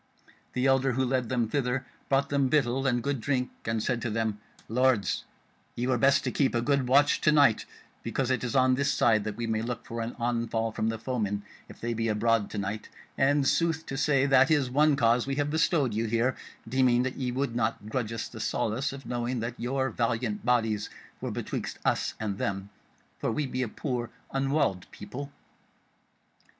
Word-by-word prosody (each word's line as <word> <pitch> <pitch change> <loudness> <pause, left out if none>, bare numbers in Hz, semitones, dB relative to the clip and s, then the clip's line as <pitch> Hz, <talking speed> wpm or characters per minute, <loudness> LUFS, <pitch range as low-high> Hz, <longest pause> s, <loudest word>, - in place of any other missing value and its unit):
The 125 +1 0
elder 135 -1 +3
who 130 +2 +1
led 125 -2 0
them 120 -3 +1
thither, 130 +1 -1 0.2
brought 140 +1 +2
them 140 -2 +2
victual 135 -2 +2
and 120 -2 +1
good 140 -3 -1
drink, 125 0 0
and 115 -1 -1
said 125 -2 0
to 120 - -2
them: 110 -1 -1 0.3
"Lords, 125 -2 +1 0.5
ye 120 - -1
were 130 -2 +1
best 135 +2 +4
to - - -1
keep 135 -4 +1
a 120 - +2
good 140 -1 +1
watch 140 +3 +4
to 155 - +4
night 140 -7 +4 0.3
because 130 -1 -1
it 130 - 0
is 125 0 -2
on 130 -1 +5
this 140 +2 +1
side 115 -7 +3
that 105 -1 -3
we 120 - -3
may 110 -1 0
look 120 0 -4
for 115 0 -4
an 115 +1 -4
onfall 115 -2 -1
from 110 - 0
the 115 - -2
foemen 110 -4 -2 0.3
if - - -12
they 120 0 -2
be 115 0 -1
abroad 110 0 +2
to - - -6
night; 100 +2 -4 0.3
and 140 0 +3
sooth 165 -1 +1
to 135 - -5
say 140 -1 +2
that 135 +1 +5
is 145 -5 +2
one 150 +2 +4
cause 120 -1 +3
we 135 - -1
have 145 +1 0
bestowed 155 - +2
you 110 +2 0
here, 115 +4 +1 0.3
deeming 125 0 +3
that 130 0 -3
ye 130 -2 -1
would 130 -1 -2
not 110 -2 -1
grudge 115 -1 -2
us 115 -1 -3
the 115 - -10
solace 115 +4 -1
of 135 0 -9
knowing 120 0 -2
that 115 +1 -3
your 130 +2 -1
valiant 115 -2 -1
bodies 110 -4 +1 0.3
were - - -3
betwixt - - -4
us - - +1
and 100 -3 -3
them, 100 +1 -3 0.5
for - - -1
we 145 +6 -1
be 130 -1 -3
a 125 - 0
poor 120 0 -3 0.2
unwalled 135 -9 0
people." 140 +7 -8
125 Hz, 200 wpm, -28 LUFS, 115-135 Hz, 0.5 s, on